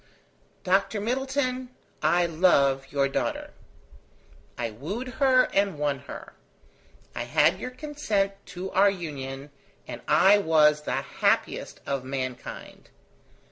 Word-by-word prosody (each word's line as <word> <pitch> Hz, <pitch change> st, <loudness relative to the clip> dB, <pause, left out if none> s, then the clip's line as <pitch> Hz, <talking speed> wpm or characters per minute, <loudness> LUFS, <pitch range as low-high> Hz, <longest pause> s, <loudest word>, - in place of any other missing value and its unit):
"Dr 195 Hz, +3 st, +1 dB
Middleton, 255 Hz, +2 st, -1 dB, 0.3 s
I 175 Hz, 0 st, +3 dB
love 140 Hz, -6 st, +2 dB
your 140 Hz, -1 st, +2 dB
daughter. 135 Hz, -, -3 dB, 1.0 s
I 115 Hz, -2 st, -3 dB
wooed 185 Hz, -, -5 dB
her 260 Hz, -2 st, +6 dB
and 200 Hz, -4 st, +1 dB
won 145 Hz, -2 st, -1 dB
her; -, -, -9 dB, 0.8 s
I -, -, -4 dB
had -, -, +3 dB
your 255 Hz, -, -4 dB
consent 255 Hz, -8 st, -1 dB, 0.2 s
to 185 Hz, +1 st, -6 dB
our 200 Hz, +2 st, +5 dB
union, 145 Hz, -6 st, -6 dB, 0.4 s
and -, -, -7 dB
I 205 Hz, +2 st, +6 dB
was 150 Hz, -4 st, +4 dB
the -, -, -3 dB
happiest -, -, -1 dB
of 140 Hz, -2 st, -2 dB
mankind. 130 Hz, -2 st, -6 dB
180 Hz, 115 wpm, -26 LUFS, 140-215 Hz, 1.0 s, her